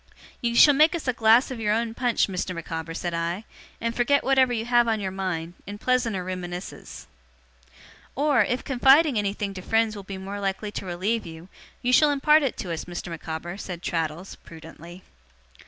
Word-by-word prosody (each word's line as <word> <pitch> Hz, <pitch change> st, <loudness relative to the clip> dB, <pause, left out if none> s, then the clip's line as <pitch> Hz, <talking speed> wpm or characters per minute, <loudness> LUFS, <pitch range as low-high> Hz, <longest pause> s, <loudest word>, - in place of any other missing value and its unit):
'You 235 Hz, -1 st, -1 dB
shall 290 Hz, +4 st, +8 dB
make 310 Hz, +5 st, +4 dB
us 330 Hz, -, -6 dB
a 255 Hz, -, +2 dB
glass 230 Hz, +3 st, +4 dB
of 250 Hz, -, -5 dB
your 210 Hz, -1 st, +1 dB
own 230 Hz, 0 st, -2 dB
punch, 245 Hz, 0 st, +1 dB
Mr. 185 Hz, -1 st, -4 dB
Micawber,' 165 Hz, 0 st, -5 dB
said 175 Hz, 0 st, -3 dB
I, 170 Hz, +4 st, -2 dB, 0.4 s
'and 230 Hz, 0 st, -2 dB
forget 280 Hz, +4 st, +2 dB
whatever 265 Hz, -2 st, +3 dB
you 225 Hz, -2 st, -2 dB
have 240 Hz, 0 st, +3 dB
on 220 Hz, -1 st, +1 dB
your 190 Hz, -2 st, -3 dB
mind, 180 Hz, -3 st, -4 dB
in 205 Hz, +1 st, -6 dB
pleasanter 230 Hz, -5 st, 0 dB
reminiscences.' 180 Hz, -, -7 dB, 1.1 s
'Or, 280 Hz, -4 st, +3 dB
if 245 Hz, +5 st, -2 dB
confiding 270 Hz, 0 st, +4 dB
anything 200 Hz, 0 st, -2 dB
to 185 Hz, -, -7 dB
friends 225 Hz, +2 st, +1 dB
will 205 Hz, -, -7 dB
be 195 Hz, 0 st, -8 dB
more 195 Hz, +2 st, -6 dB
likely 200 Hz, +1 st, -3 dB
to 195 Hz, -, -6 dB
relieve 185 Hz, +4 st, -2 dB
you, 165 Hz, +2 st, -11 dB, 0.3 s
you 250 Hz, +1 st, +1 dB
shall 300 Hz, +3 st, +6 dB
impart 300 Hz, +2 st, +4 dB
it 270 Hz, -4 st, -2 dB
to 180 Hz, -, -5 dB
us, 165 Hz, -, -5 dB
Mr. 175 Hz, 0 st, -6 dB
Micawber,' 165 Hz, +2 st, -6 dB
said 180 Hz, -3 st, -7 dB
Traddles, 165 Hz, +2 st, -3 dB
prudently. 165 Hz, +2 st, -13 dB
205 Hz, 190 wpm, -25 LUFS, 175-245 Hz, 1.1 s, shall